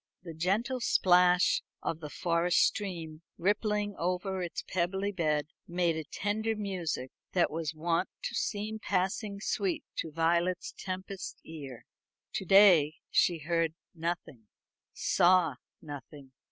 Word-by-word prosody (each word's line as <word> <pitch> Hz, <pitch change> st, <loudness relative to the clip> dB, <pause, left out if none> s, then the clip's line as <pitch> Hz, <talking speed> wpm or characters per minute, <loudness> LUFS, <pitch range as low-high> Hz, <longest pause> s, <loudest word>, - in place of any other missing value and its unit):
The 170 Hz, -2 st, -7 dB
gentle 200 Hz, +11 st, 0 dB, 0.2 s
plash 180 Hz, 0 st, +5 dB, 0.2 s
of 160 Hz, -, -2 dB
the 150 Hz, -2 st, -7 dB
forest 170 Hz, +2 st, +1 dB
stream, 170 Hz, -6 st, -3 dB, 0.2 s
rippling 205 Hz, +2 st, 0 dB
over 185 Hz, +2 st, -1 dB
its 175 Hz, -2 st, -4 dB
pebbly 190 Hz, +3 st, -1 dB
bed, 155 Hz, -5 st, 0 dB, 0.2 s
made 175 Hz, -1 st, +1 dB
a 160 Hz, -, -3 dB
tender 220 Hz, +5 st, -1 dB
music 180 Hz, -10 st, -3 dB, 0.2 s
that 175 Hz, -2 st, +3 dB
was 160 Hz, -1 st, -3 dB
wont 170 Hz, +3 st, 0 dB
to -, -, -3 dB
seem 215 Hz, -1 st, -2 dB
passing 200 Hz, +1 st, -1 dB
sweet 195 Hz, -3 st, -1 dB
to 160 Hz, -, -3 dB
Violet 170 Hz, +3 st, +1 dB
Tempest's 190 Hz, 0 st, -5 dB
ear. 140 Hz, -7 st, -9 dB, 0.5 s
To 190 Hz, -, -2 dB
day 180 Hz, -6 st, +7 dB, 0.2 s
she 175 Hz, -, +4 dB
heard 165 Hz, -2 st, +1 dB, 0.2 s
nothing, 165 Hz, -, -4 dB, 0.4 s
saw 175 Hz, -6 st, +3 dB, 0.3 s
nothing. 145 Hz, -2 st, -9 dB
175 Hz, 125 wpm, -31 LUFS, 160-195 Hz, 0.5 s, day